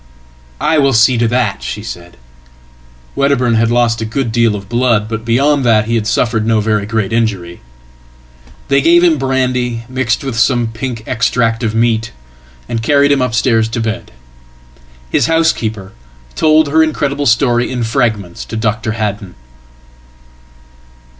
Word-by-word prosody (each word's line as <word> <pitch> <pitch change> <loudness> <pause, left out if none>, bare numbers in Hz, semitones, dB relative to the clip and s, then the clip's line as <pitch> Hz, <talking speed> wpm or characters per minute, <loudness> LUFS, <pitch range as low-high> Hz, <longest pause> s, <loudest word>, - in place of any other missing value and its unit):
""I 160 - +1
will 140 -1 +2
see 115 +2 +4
to 115 - +2
that," 120 -4 -1
she 105 - -6
said. 85 -5 -9 1.0
Wedderburn 140 -4 +1
had 115 0 +2
lost 120 -1 +1
a - - -1
good 115 +1 -2
deal 115 -2 +2
of 100 -1 -8
blood, 120 -2 +1
but 110 0 -5
beyond 135 +5 +1
that 110 -3 +3
he 115 - -3
had 110 -2 0
sufferedno 115 -1 +1
very 105 -1 -1
great 110 -1 -2
injury. 100 -7 -2 1.1
They 140 0 +2
gave 170 +3 +4
him 165 -4 +3
brandy 125 -3 -1
mixed 130 -1 -1
with 130 -4 -3
some 120 -1 +2
pink 115 0 -6
extract 115 -1 0
ofmeat, 115 0 0 0.6
and 115 - -3
carried 140 +4 +3
him 140 -2 +2
upstairs 115 -2 +1
to 115 - -4
bed. 110 -1 -4 1.0
His - - +2
housekeeper 115 -12 0 0.4
told 155 -1 +3
her 160 +3 +2
incrediblestory 140 -6 +1
in 125 -2 -3
fragments 110 -6 -2
to 110 - -6
Dr. 110 0 -2
Haddon. 105 -4 -4
115 Hz, 140 wpm, -14 LUFS, 110-130 Hz, 1.1 s, see